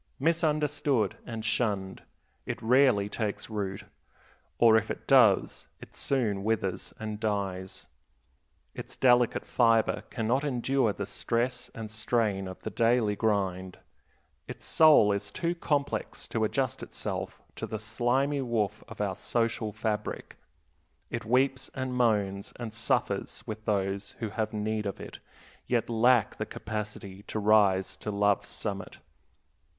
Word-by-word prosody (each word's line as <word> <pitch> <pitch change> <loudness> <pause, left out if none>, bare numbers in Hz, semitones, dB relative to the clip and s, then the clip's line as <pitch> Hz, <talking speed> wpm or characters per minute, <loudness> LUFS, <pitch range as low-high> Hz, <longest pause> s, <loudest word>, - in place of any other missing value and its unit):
Misunderstood 150 - +1
and 115 -1 -5
shunned, 105 -4 -1 0.5
it - - -3
rarely 125 -3 +4
takes 105 0 -4
root; 100 -3 -3 0.7
or 115 -2 +6
if 110 0 +2
it - - -5
does, - - +4
it - - -13
soon 110 -8 0
withers 100 -4 -1
and 110 -1 -5
dies. 100 -3 -3 0.9
Its - - -8
delicate 120 -2 +3
fiber 115 -2 +3
can 115 -3 -3
not 130 +5 +2
endure 130 -3 +1
the 100 0 -4
stress 120 +5 -2
and 110 -2 -6
strain 110 -3 0
of 95 - -9
the - - -4
daily 115 -3 +2
grind. 95 -4 -1 0.7
Its - - -8
soul 155 -10 +6
is 100 0 -2
too 170 - -1
complex 145 -4 -2
to 110 -1 +1
adjust 130 +3 -1
itself - - -5 0.2
to - - -5
the 110 - -4
slimy 120 +6 0
woof 115 -6 -1
of - - -7
our - - -1
social 115 -2 -1
fabric. 105 0 -3 0.8
It - - -4
weeps 130 +3 +2
and 130 -1 -3
moans 105 -5 +1
and 115 -3 -6
suffers 115 0 -1
with 110 0 -7
those 100 -1 -1
who 115 -3 -3
have 110 0 -2
need 105 0 -2
of 100 - -5
it, - - -9 0.5
yet 120 -1 0
lack 115 0 +3
the - - -3
capacity 105 -2 -6
to - - -4
rise 100 -3 +3
to - - -6
love's 100 -1 +1
summit. 100 -3 -5
110 Hz, 135 wpm, -29 LUFS, 100-125 Hz, 0.9 s, or